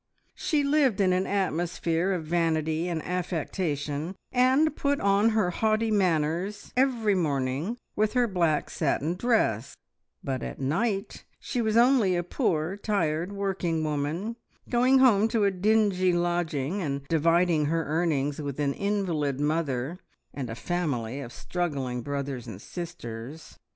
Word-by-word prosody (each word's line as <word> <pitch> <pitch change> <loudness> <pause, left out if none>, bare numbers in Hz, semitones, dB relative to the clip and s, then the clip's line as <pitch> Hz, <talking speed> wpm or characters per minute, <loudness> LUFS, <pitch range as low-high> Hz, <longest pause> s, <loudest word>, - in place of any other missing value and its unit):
She 300 -2 0
lived 280 -7 +2
in 185 -2 +3
an 185 +1 0
atmosphere 175 -2 0
of 175 -4 -2
vanity 160 0 0
and 165 -3 -3
affectation, 165 -2 -2 0.2
and 260 +5 +3
put 280 0 0
on 200 +2 +3
her 215 -5 +1
haughty 220 +3 +1
manners 180 0 0
every 245 -5 +2
morning 150 - -1 0.2
with 215 0 +1
her 250 -2 +3
black 170 -7 0
satin 155 +1 0
dress; 180 - 0 0.5
but 130 -2 -2
at - - -6
night 195 - -1 0.2
she 245 - -2
was 220 0 +1
only 235 -6 +4
a 175 - 0
poor, 165 +1 -1
tired, 175 -4 -1
working 190 -5 -1
woman, 155 +9 -2 0.3
going 255 +2 +4
home 225 -5 +5
to 225 -2 +1
a 200 - +3
dingy 190 -2 +2
lodging, 175 -1 -1
and 140 -3 -3
dividing 165 0 +3
her 165 +2 0
earnings 150 -2 0
with 140 -1 -5
an 140 -1 +1
invalid 170 -9 -1
mother 150 0 -1 0.3
and 130 -4 -5
a 115 - -5
family 140 -6 -2
of 125 -4 -7
struggling 135 -7 -3
brothers 140 -2 -4
and 95 - -7
sisters. 150 - -8
175 Hz, 140 wpm, -27 LUFS, 150-205 Hz, 0.5 s, home